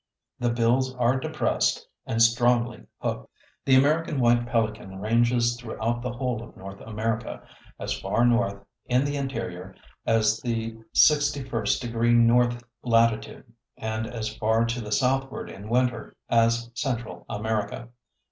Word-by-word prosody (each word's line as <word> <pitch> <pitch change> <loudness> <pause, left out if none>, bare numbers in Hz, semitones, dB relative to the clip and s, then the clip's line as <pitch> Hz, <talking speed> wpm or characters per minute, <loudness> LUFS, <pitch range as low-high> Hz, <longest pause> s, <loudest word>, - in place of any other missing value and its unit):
The 120 - +1
bills 120 +3 +1
are 125 +1 +2
depressed - - 0 0.2
and 115 0 +3
strongly 120 0 +2
hooked. - - -4 0.4
The 130 - +5
American 150 +2 +2
White 120 -1 +3
Pelican 110 -5 -2
ranges 120 +2 +2
throughout 120 0 -3
the 125 0 -3
whole 125 -2 -2
of 120 - -12
North 100 +1 -10
America 110 +1 -3 0.4
as - - -2
far 105 +5 +1
north, 115 -5 +1 0.2
in 125 +2 +2
the 145 0 -2
interior, 115 -9 -5 0.3
as 110 -1 +3
the 115 -2 -2 0.2
61° 120 -5 +2
north 120 +1 +4 0.2
latitude, 115 0 +1 0.2
and 110 0 -3
as 115 -2 -5
far 110 +1 +2
to 120 +1 -2
the 105 -1 -7
southward 135 +5 0
in 100 +2 -10
winter 125 0 0
as 115 0 +2
Central 115 -8 -3
America. 110 +2 -3
115 Hz, 130 wpm, -26 LUFS, 110-125 Hz, 0.4 s, The